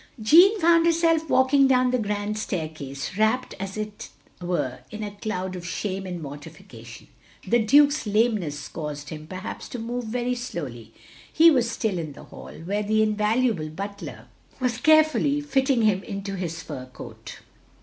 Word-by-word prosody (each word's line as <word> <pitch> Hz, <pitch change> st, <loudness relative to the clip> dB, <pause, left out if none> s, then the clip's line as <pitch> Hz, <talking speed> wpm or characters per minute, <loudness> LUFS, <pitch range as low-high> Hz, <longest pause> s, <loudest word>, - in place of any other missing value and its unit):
Jeanne 350 Hz, -, +6 dB
found 335 Hz, -1 st, +4 dB
herself 330 Hz, -2 st, +2 dB
walking 270 Hz, +1 st, +4 dB
down 255 Hz, -1 st, +3 dB
the 255 Hz, -, +1 dB
grand 210 Hz, 0 st, -2 dB
staircase, 155 Hz, -7 st, -5 dB
wrapt 220 Hz, +4 st, +1 dB
as 195 Hz, +1 st, -5 dB
it 215 Hz, -1 st, -6 dB, 0.3 s
were 170 Hz, -8 st, -2 dB
in 215 Hz, 0 st, -6 dB
a 205 Hz, -, -4 dB
cloud 190 Hz, -3 st, -4 dB
of 180 Hz, -, -7 dB
shame 190 Hz, +2 st, -4 dB
and 175 Hz, -3 st, -5 dB
mortification. 140 Hz, -6 st, -11 dB, 0.4 s
The 240 Hz, +5 st, +3 dB
Duke's 285 Hz, +2 st, +4 dB
lameness 205 Hz, -9 st, 0 dB
caused 150 Hz, -2 st, -6 dB
him, 155 Hz, -1 st, -8 dB
perhaps, 185 Hz, +2 st, -7 dB
to -, -, -6 dB
move 240 Hz, +1 st, -4 dB
very 245 Hz, +2 st, -1 dB
slowly. 140 Hz, -, -6 dB, 0.4 s
He 330 Hz, +1 st, +7 dB
was 245 Hz, -5 st, +2 dB
still 220 Hz, -5 st, -2 dB
in 155 Hz, -3 st, -5 dB
the -, -, -12 dB
hall, -, -, -11 dB
where 205 Hz, +3 st, -1 dB
the 215 Hz, +1 st, +2 dB
invaluable 215 Hz, -4 st, +1 dB
butler 170 Hz, -, -7 dB, 0.3 s
was 250 Hz, -2 st, -1 dB
carefully 310 Hz, 0 st, +4 dB
fitting 270 Hz, -4 st, +1 dB
him 205 Hz, -3 st, +3 dB
into 200 Hz, -1 st, -6 dB
his 170 Hz, -3 st, -4 dB
fur 130 Hz, -4 st, -7 dB
coat. 130 Hz, -, -10 dB
210 Hz, 160 wpm, -25 LUFS, 170-250 Hz, 0.4 s, He